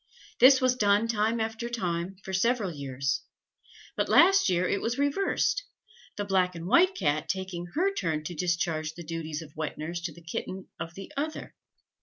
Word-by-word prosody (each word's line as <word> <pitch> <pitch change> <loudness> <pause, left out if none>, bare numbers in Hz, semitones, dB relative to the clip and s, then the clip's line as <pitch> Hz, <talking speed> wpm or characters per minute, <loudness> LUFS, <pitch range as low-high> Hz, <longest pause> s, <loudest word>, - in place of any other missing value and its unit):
This 260 +1 +8
was 255 -1 +3
done 205 -1 +3
time 225 +1 +1
after 225 +1 -3
time, 180 -5 -2
for 190 - -6
several 215 0 +1
years; 135 -1 -2 0.7
but - - -1
last 385 - +6
year 180 0 +2
it 200 - 0
was 235 +2 -1
reversed, 390 - +1 0.5
the 205 - -2
black 185 -2 +1
and 165 0 -6
white 365 - +4
Cat 155 - 0
taking 190 -2 -3
her 385 +5 +2
turn 160 - -1
to 175 - -5
discharge 165 -2 -1
the 175 - -8
duties 160 -1 -4
of 150 -2 -15
wet 155 0 -4
nurse 170 +3 -4
to 170 -1 -4
the 170 +2 -15
kitten 185 +3 -5
of 165 +1 -6
the 195 +9 -9
other. 305 +3 -4
190 Hz, 180 wpm, -28 LUFS, 165-235 Hz, 0.7 s, This